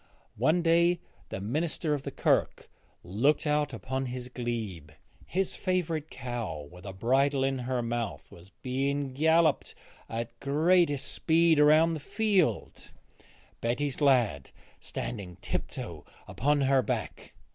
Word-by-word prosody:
One 155 +8 +3
day 170 +1 +4 0.3
the - - -4
minister 150 - -1
of 145 - -1
the - - -5
Kirk - - 0 0.3
looked 130 - +1
out 150 -1 +1
upon 130 0 -3
his 125 0 -5
glebe. 115 - -4 0.4
His 190 +1 -1
favourite 170 -5 -1
cow, 110 - -5
with 90 +2 -13
a - - -4
bridle 135 +7 +2
in 135 -1 0
her 125 -2 0
mouth, 115 -2 -4
was 85 +2 -14
being 135 +1 -1
galloped 160 +1 +2 0.3
at 115 +1 -5
greatest 150 +1 +2
speed 165 -1 +3
around 155 +3 +5
the 160 - -3
field, 200 +1 0 0.7
Betty's 130 +5 -1
lad 120 - +3 0.3
standing 95 -7 -6
tip - - -3
toe - - -7 0.2
upon 145 +3 +1
her 135 -1 +4
back. - - -4
135 Hz, 130 wpm, -29 LUFS, 120-155 Hz, 0.7 s, around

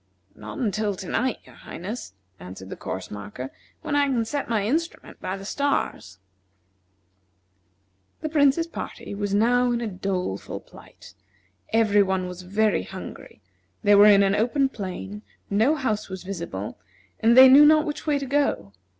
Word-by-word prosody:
"Not - - -9
until 215 -5 -1
to 185 - -8
night, 250 +5 0
your - - -17
Highness," 185 - -8 0.2
answered 95 +2 -10
the - - -4
course 95 - -6
marker, 105 +6 -7 0.3
"when 290 - -2
I 285 0 +3
can 240 -4 0
set 280 +4 -3
my 215 -3 0
instrument 325 +9 -3
by 185 - -3
the 195 - -10
stars." 200 - -2 2.0
The 310 - -3
Prince's 295 +1 +3
party 335 - -7
was 200 0 -2
now 245 +3 +3
in 240 - 0
a 235 - -3
doleful 185 - -3
plight. - - -16 0.6
Every 215 -2 +4
one 190 -2 0
was 180 0 -8
very 205 +4 +1
hungry; - - -10 0.4
they 205 -1 +5
were 205 +1 +8
in 200 -1 +7
an 195 0 +2
open 250 +6 +1
plain, 200 -2 -6 0.3
no 225 +10 +3
house 220 -8 -2
was 190 -1 -7
visible, 170 - -6 0.4
and 230 +2 +4
they 260 0 +11
knew 275 +3 +8
not 310 +1 +6
which 300 0 -5
way 295 -1 +2
to 280 - -4
go. 270 - 0
210 Hz, 160 wpm, -24 LUFS, 190-265 Hz, 2.0 s, they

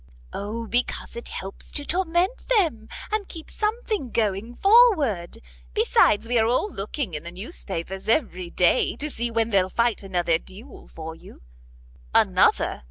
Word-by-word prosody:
"O, 220 +3 -4
because 245 +2 -1
it 235 - -5
helps 195 +1 -7
to 290 - -2
torment 360 +5 0
them, 325 - +1 0.2
and 425 -2 -1
keeps 325 -2 -10
something 430 - -2
going 220 +1 -1
forward. 335 - +4 0.4
Besides, 210 +2 +3
we 240 0 +2
are 220 - +3
all 255 - 0
looking 205 - -4
in 150 - -4
the 170 - -8
news 195 - -5
papers 190 +2 -5
every 185 - 0
day, 180 +7 +2
to 300 +1 -3
see 235 -1 -2
when 230 0 0
they'll 190 -2 +3
fight 235 +2 +1
another 175 -4 0
duel 215 +10 -12
for 160 0 -8
you." 160 - -15 0.7
"Another?" - - +3
230 Hz, 155 wpm, -24 LUFS, 190-310 Hz, 0.7 s, forward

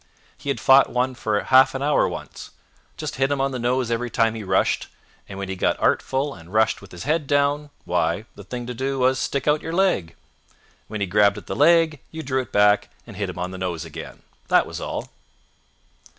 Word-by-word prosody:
He 140 - -7
had 140 - -1
fought 135 +1 +6
one 125 +1 0
for 110 -4 -1
half 130 +3 +5
an 135 - -2
hour 145 0 +3
once. - - -8 0.5
Just - - -5
hit 135 +1 +1
him 140 - 0
on 135 0 +1
the 130 - -4
nose 125 0 0
every 120 +1 -1
time 115 -1 +2
he 110 -1 -6
rushed, 95 -1 +1 0.4
and 95 - -8
when 100 -1 -4
he 95 - -4
got - - 0
artful 135 +2 +1
and 85 0 -14
rushed 110 +1 +2
with 100 - -14
his 90 - -8
head 150 0 0
down, 145 +1 +1 0.2
why, 85 +3 0
the 100 - -12
thing 120 +5 -6
to 125 - -5
do 135 +3 -2
was 130 +1 +2
to - - -1
stick 140 0 -3
out 150 +1 +3
your 165 - -5
leg. 170 - +1 0.7
When 105 -1 -5
he - - +2
grabbed 100 +2 +3
at 105 - -9
the - - -4
leg 165 -1 +4
you 160 0 -7
drew 130 -1 0
it 125 - -11
back 105 0 +3 0.2
and 115 - -11
hit 100 -1 -3
hint 90 - -7
on 90 +1 -3
the 95 - -7
nose 90 -4 -3
again. - - -9 0.2
That - - +4
was - - -7
all. - - -4
125 Hz, 225 wpm, -23 LUFS, 100-140 Hz, 0.7 s, fought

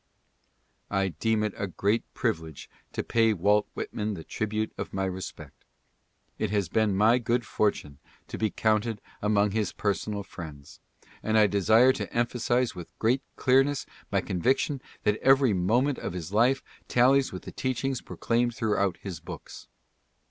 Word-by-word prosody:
I 95 -1 +1
deem 110 +6 0
it 105 -2 -1
a 100 - -2
great 100 +5 -1
privilege 80 -3 -3 0.2
to - - -2
pay 115 -1 +3
Walt 105 +3 +2
Whitman 105 -1 -3
the 80 - -8
tribute 110 +3 -2
of - - -6
my 95 0 0
respect. 95 0 -7 0.8
It - - 0
has 100 -4 0
been 110 -1 +2
my^good 115 +3 +3
fortune 100 -10 -1 0.3
to - - -6
be 110 - +1
counted 110 0 0 0.2
among 105 -1 +2
his 105 -2 0
personal 100 0 -2
friends, 80 -2 -10 0.4
and 110 0 +1
I 110 - +7
desire 110 +6 +5
to - - -5
emphasize 120 0 +1
with 90 -2 -8
great 125 +4 +2
clearness 135 +2 +3 0.3
my - - +2
conviction 130 - 0 0.2
that 105 0 +2
every 135 -3 +4
nfoment 120 +10 +1
of - - -4
his 90 +1 -6
life 125 +5 +3 0.2
tallies 130 +2 +4
with 90 - -7
the - - -8
teachings 130 0 -2
proclaimed 120 0 -1
throughout 100 -4 0
his 95 -5 -6
books. 85 - -10
110 Hz, 150 wpm, -27 LUFS, 95-120 Hz, 0.8 s, I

